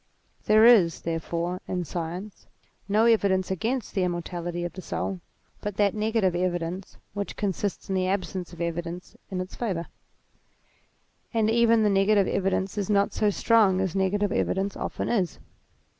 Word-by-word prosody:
There 215 Hz, +1 st, +6 dB
is, 200 Hz, -9 st, +6 dB
therefore, 170 Hz, +2 st, -3 dB
in 180 Hz, -1 st, -2 dB
science, 175 Hz, +5 st, -6 dB, 0.4 s
no 215 Hz, +3 st, +4 dB
evidence 195 Hz, -5 st, +3 dB
against 225 Hz, +6 st, -2 dB
the 195 Hz, -, 0 dB
immortality 175 Hz, -1 st, -3 dB
of 175 Hz, -, -4 dB
the 185 Hz, -, -8 dB
soul 185 Hz, +1 st, -3 dB, 0.4 s
but 210 Hz, -2 st, -4 dB
that 205 Hz, -2 st, +3 dB
negative 215 Hz, -4 st, +1 dB
evidence, 175 Hz, +1 st, -2 dB, 0.2 s
which 200 Hz, 0 st, -4 dB
consists 200 Hz, 0 st, -2 dB
in 195 Hz, -, -2 dB
the 185 Hz, -1 st, +1 dB
absence 185 Hz, -2 st, -2 dB
of 170 Hz, -1 st, -9 dB
evidence 170 Hz, +1 st, -4 dB
in 185 Hz, -, -3 dB
its 185 Hz, +1 st, -5 dB
favour. 185 Hz, -8 st, -2 dB, 1.5 s
And 220 Hz, -1 st, +3 dB
even 230 Hz, -1 st, +4 dB
the 210 Hz, -, +4 dB
negative 195 Hz, 0 st, +3 dB
evidence 195 Hz, +1 st, -1 dB
is 200 Hz, -, -2 dB
not 200 Hz, -1 st, +2 dB
so 210 Hz, -, +2 dB
strong 205 Hz, -2 st, +3 dB
as 190 Hz, -2 st, -1 dB
negative 195 Hz, +1 st, +1 dB
evidence 195 Hz, 0 st, 0 dB
often -, -, -3 dB
is. 190 Hz, -8 st, 0 dB
190 Hz, 155 wpm, -26 LUFS, 175-210 Hz, 1.5 s, There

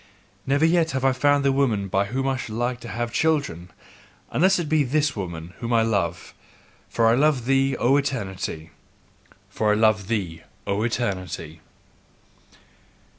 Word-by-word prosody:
Never 140 Hz, +3 st, +3 dB
yet 165 Hz, -1 st, +3 dB
have 130 Hz, 0 st, -1 dB
I 135 Hz, -, +5 dB
found 145 Hz, +2 st, +2 dB
the 140 Hz, -, +4 dB
woman 120 Hz, -8 st, +1 dB
by 95 Hz, +1 st, +1 dB
whom 130 Hz, +6 st, -2 dB
I 135 Hz, -, +1 dB
should 115 Hz, -4 st, -6 dB
like 120 Hz, +1 st, -1 dB
to 120 Hz, -, -10 dB
have 120 Hz, +1 st, -4 dB
children, 140 Hz, -, 0 dB, 0.6 s
unless 190 Hz, +5 st, +3 dB
it 170 Hz, -3 st, -2 dB
be 155 Hz, -1 st, +2 dB
this 145 Hz, +2 st, 0 dB
woman 85 Hz, -3 st, -6 dB
whom 115 Hz, 0 st, -4 dB
I 115 Hz, -1 st, +4 dB
love: 95 Hz, -6 st, -2 dB, 0.6 s
for 115 Hz, -, +1 dB
I 115 Hz, -, +5 dB
love 135 Hz, -1 st, +2 dB
thee, 135 Hz, +1 st, +2 dB
O 130 Hz, +3 st, +3 dB
Eternity! 95 Hz, -, -3 dB, 0.8 s
FOR 105 Hz, -1 st, +1 dB
I -, -, +2 dB
LOVE 110 Hz, -3 st, +2 dB
THEE, 95 Hz, -8 st, -3 dB, 0.2 s
O 100 Hz, +1 st, -1 dB
ETERNITY! 95 Hz, -9 st, -3 dB
120 Hz, 160 wpm, -24 LUFS, 100-140 Hz, 0.8 s, I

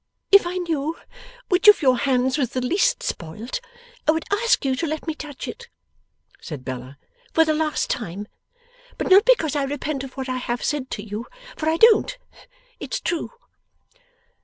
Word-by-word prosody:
'If 400 Hz, -3 st, +7 dB
I 360 Hz, +1 st, -3 dB
knew 325 Hz, -3 st, -2 dB, 0.5 s
which 360 Hz, +2 st, +2 dB
of 420 Hz, -6 st, +8 dB
your 255 Hz, -3 st, +4 dB
hands 260 Hz, -1 st, +1 dB
was 265 Hz, -6 st, -1 dB
the 255 Hz, -, 0 dB
least 370 Hz, +10 st, +1 dB
spoilt, 210 Hz, -, -5 dB, 0.5 s
I -, -, +7 dB
would 320 Hz, -, -2 dB
ask 460 Hz, -, +2 dB
you 265 Hz, -1 st, +1 dB
to 330 Hz, -, -1 dB
let 310 Hz, +1 st, -4 dB
me 320 Hz, -, -2 dB
touch 300 Hz, -3 st, -8 dB
it,' 475 Hz, 0 st, -8 dB, 0.7 s
said 145 Hz, -6 st, -8 dB
Bella, 130 Hz, +1 st, -6 dB, 0.4 s
'for 325 Hz, -, +6 dB
the 310 Hz, -, +2 dB
last 310 Hz, 0 st, 0 dB
time. 205 Hz, -2 st, -4 dB, 0.7 s
But -, -, -2 dB
not 390 Hz, +2 st, +8 dB
because 325 Hz, -, +3 dB
I 290 Hz, -, +1 dB
repent 280 Hz, 0 st, -3 dB
of 265 Hz, -1 st, -8 dB
what 265 Hz, 0 st, -4 dB
I 255 Hz, 0 st, -2 dB
have 240 Hz, -1 st, -3 dB
said 290 Hz, -3 st, -1 dB
to 205 Hz, -, -5 dB
you. 215 Hz, +3 st, -6 dB, 0.3 s
For 315 Hz, -, -1 dB
I 325 Hz, -, +1 dB
don't. 460 Hz, +4 st, +5 dB, 0.6 s
It's -, -, -3 dB
true! 340 Hz, -2 st, -2 dB
295 Hz, 180 wpm, -23 LUFS, 250-340 Hz, 0.7 s, of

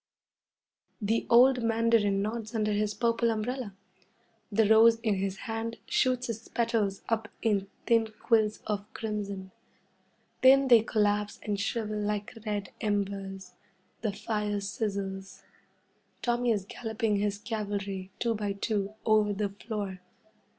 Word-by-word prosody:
The 225 Hz, +1 st, 0 dB
old 250 Hz, +2 st, +6 dB
mandarin 225 Hz, -3 st, +2 dB
nods 220 Hz, +1 st, -4 dB
under 215 Hz, -1 st, +1 dB
his 210 Hz, 0 st, 0 dB
purple 235 Hz, 0 st, +2 dB
umbrella. 225 Hz, -1 st, -3 dB, 0.8 s
The 215 Hz, +1 st, +3 dB
rose 225 Hz, +1 st, +6 dB
in 220 Hz, -2 st, +1 dB
his 195 Hz, 0 st, -2 dB
hand 225 Hz, 0 st, -3 dB
shoots 255 Hz, -1 st, +1 dB
its 230 Hz, -1 st, -5 dB
petals 225 Hz, -4 st, 0 dB
up 225 Hz, -2 st, 0 dB, 0.2 s
in 205 Hz, -4 st, +1 dB, 0.2 s
thin 225 Hz, -2 st, +3 dB
quills 220 Hz, -3 st, +2 dB
of 210 Hz, -1 st, -3 dB
crimson. 200 Hz, -3 st, -4 dB, 0.9 s
Then 270 Hz, +1 st, +6 dB
they 235 Hz, -3 st, +8 dB
collapse 210 Hz, -2 st, 0 dB
and 205 Hz, -2 st, -2 dB
shrivel 215 Hz, 0 st, -2 dB
like 210 Hz, +1 st, -2 dB
red 205 Hz, -3 st, -2 dB
embers. 195 Hz, -3 st, -2 dB, 0.5 s
The 220 Hz, -2 st, 0 dB
fire 210 Hz, 0 st, -2 dB
sizzles. 195 Hz, -1 st, -4 dB, 0.8 s
Tommy 240 Hz, 0 st, +1 dB
is 205 Hz, -4 st, +1 dB
galloping 220 Hz, -1 st, -2 dB
his 205 Hz, 0 st, 0 dB
cavalry, 200 Hz, -3 st, -4 dB
two 235 Hz, -1 st, 0 dB
by 205 Hz, -2 st, -2 dB
two, 200 Hz, 0 st, -2 dB
over 215 Hz, -2 st, +4 dB
the 205 Hz, 0 st, -1 dB
floor. 200 Hz, -2 st, -5 dB
210 Hz, 130 wpm, -29 LUFS, 200-230 Hz, 0.9 s, they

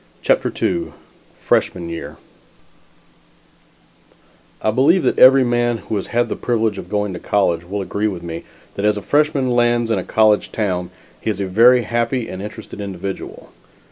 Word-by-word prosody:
CHAPTER -, -, +2 dB
II -, -, -1 dB, 0.5 s
FRESHMAN 85 Hz, -, 0 dB
YEAR 85 Hz, 0 st, -7 dB, 2.4 s
I 110 Hz, -, 0 dB
believe 150 Hz, -, +3 dB
that -, -, +1 dB
every 135 Hz, +1 st, +8 dB
man 120 Hz, -1 st, +1 dB
who 105 Hz, +1 st, -5 dB
has 100 Hz, -, -3 dB
had 120 Hz, 0 st, 0 dB
the -, -, -3 dB
privilege 115 Hz, -3 st, -1 dB
of -, -, -9 dB
going 105 Hz, -2 st, -1 dB
to 90 Hz, -, -6 dB
college 85 Hz, -4 st, 0 dB
will 100 Hz, +1 st, -2 dB
agree 100 Hz, +3 st, -2 dB
with 90 Hz, -5 st, -5 dB
me 85 Hz, -1 st, -6 dB, 0.3 s
that 100 Hz, -, -5 dB
as 105 Hz, 0 st, +2 dB
a 105 Hz, -, -6 dB
freshman 145 Hz, -3 st, +1 dB
lands 120 Hz, -1 st, +2 dB
in 105 Hz, -, +1 dB
a -, -, -4 dB
college 110 Hz, +1 st, +2 dB
town, 90 Hz, -5 st, -2 dB, 0.3 s
he -, -, -2 dB
is 105 Hz, -2 st, -2 dB
a 100 Hz, -, -1 dB
very 120 Hz, +6 st, +5 dB
happy 120 Hz, +2 st, -1 dB
and 95 Hz, -, -7 dB
interested 105 Hz, 0 st, -8 dB
individual. 95 Hz, -1 st, -7 dB
110 Hz, 170 wpm, -19 LUFS, 95-120 Hz, 2.4 s, every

